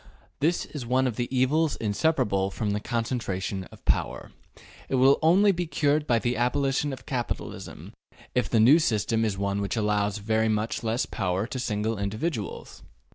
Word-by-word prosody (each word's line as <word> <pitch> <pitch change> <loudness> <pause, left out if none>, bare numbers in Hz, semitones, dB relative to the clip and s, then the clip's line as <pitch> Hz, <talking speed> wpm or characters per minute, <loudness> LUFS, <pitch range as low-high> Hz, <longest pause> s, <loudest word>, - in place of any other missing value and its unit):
This 165 +5 +1
is 145 -4 -7
one 130 +2 +1
of 125 -4 -1
the 120 +1 -2
evils 140 +4 +2
inseparable 105 -4 0
from 105 +1 -2
the 105 - -1
concentration 105 -5 -3
of - - -17
power. - - -1 0.6
It - - 0
will 135 +2 +5
only 190 +6 +5
be 175 -2 -2
cured 150 0 +1
by 120 - +3
the 120 +2 -1
abolition 135 +4 +1
of 130 - -8
capitalism 125 -3 -5 0.4
if 125 - 0
the 115 - +3
new 130 +9 +7
system 115 -5 +1
is 105 -3 -1
one 100 0 -1
which 100 +3 -2
allows 105 -1 +1
very 110 +2 +1
much 110 +1 -1
less 115 +2 0
power 95 +2 -1
to 130 +2 -5
single 110 -2 -1
individuals. 110 +4 -4
120 Hz, 170 wpm, -26 LUFS, 105-135 Hz, 0.6 s, new